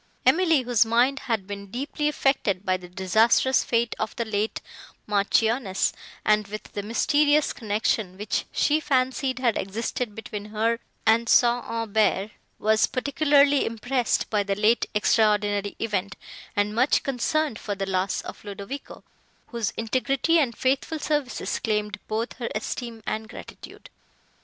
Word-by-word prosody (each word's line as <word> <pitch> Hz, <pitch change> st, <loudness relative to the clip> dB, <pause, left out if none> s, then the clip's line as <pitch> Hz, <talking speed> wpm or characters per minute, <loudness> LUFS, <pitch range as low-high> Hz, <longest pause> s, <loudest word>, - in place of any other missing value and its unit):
Emily, 330 Hz, -6 st, +4 dB
whose 240 Hz, -2 st, +3 dB
mind 240 Hz, +5 st, +2 dB
had 220 Hz, -5 st, 0 dB
been 200 Hz, 0 st, -7 dB
deeply 280 Hz, +7 st, -3 dB
affected 265 Hz, -10 st, 0 dB
by 185 Hz, -, +2 dB
the 180 Hz, -1 st, -8 dB
disastrous 220 Hz, +8 st, +3 dB
fate 235 Hz, -1 st, 0 dB
of 220 Hz, -, -3 dB
the 235 Hz, -, -2 dB
late 215 Hz, 0 st, -1 dB, 0.5 s
Marchioness 210 Hz, 0 st, +1 dB, 0.3 s
and 210 Hz, -1 st, +3 dB
with 215 Hz, +1 st, -6 dB
the 205 Hz, -, -3 dB
mysterious 290 Hz, +7 st, +2 dB
connection, 210 Hz, -3 st, -1 dB
which 210 Hz, +2 st, -2 dB
she 300 Hz, +1 st, +2 dB
fancied 260 Hz, -2 st, 0 dB
had 245 Hz, -3 st, +1 dB
existed 215 Hz, +2 st, -3 dB
between 210 Hz, -2 st, -6 dB
her 220 Hz, +2 st, 0 dB, 0.3 s
and 230 Hz, +1 st, +3 dB
St. 240 Hz, 0 st, +4 dB
Aubert, 220 Hz, -2 st, 0 dB, 0.3 s
was 220 Hz, +1 st, +3 dB
particularly 285 Hz, +1 st, +3 dB
impressed 240 Hz, +2 st, -1 dB
by 210 Hz, -2 st, +2 dB
the 200 Hz, 0 st, -1 dB
late 215 Hz, +3 st, +2 dB
extraordinary 205 Hz, -1 st, +2 dB
event, 205 Hz, -3 st, -2 dB, 0.4 s
and 205 Hz, +1 st, +1 dB
much 250 Hz, +5 st, +2 dB
concerned 275 Hz, 0 st, -1 dB
for 205 Hz, -, -4 dB
the 195 Hz, 0 st, -3 dB
loss 190 Hz, 0 st, -1 dB
of -, -, -10 dB
Ludovico, 205 Hz, +7 st, -8 dB, 0.5 s
whose 235 Hz, -7 st, -2 dB
integrity 265 Hz, +8 st, +1 dB
and 245 Hz, -7 st, 0 dB
faithful 270 Hz, +5 st, 0 dB
services 295 Hz, -4 st, -2 dB
claimed 210 Hz, -1 st, -1 dB
both 225 Hz, +2 st, -2 dB
her 235 Hz, -, -3 dB
esteem 225 Hz, +1 st, -5 dB
and 220 Hz, 0 st, -3 dB
gratitude. -, -, -11 dB
225 Hz, 140 wpm, -25 LUFS, 210-260 Hz, 0.5 s, Emily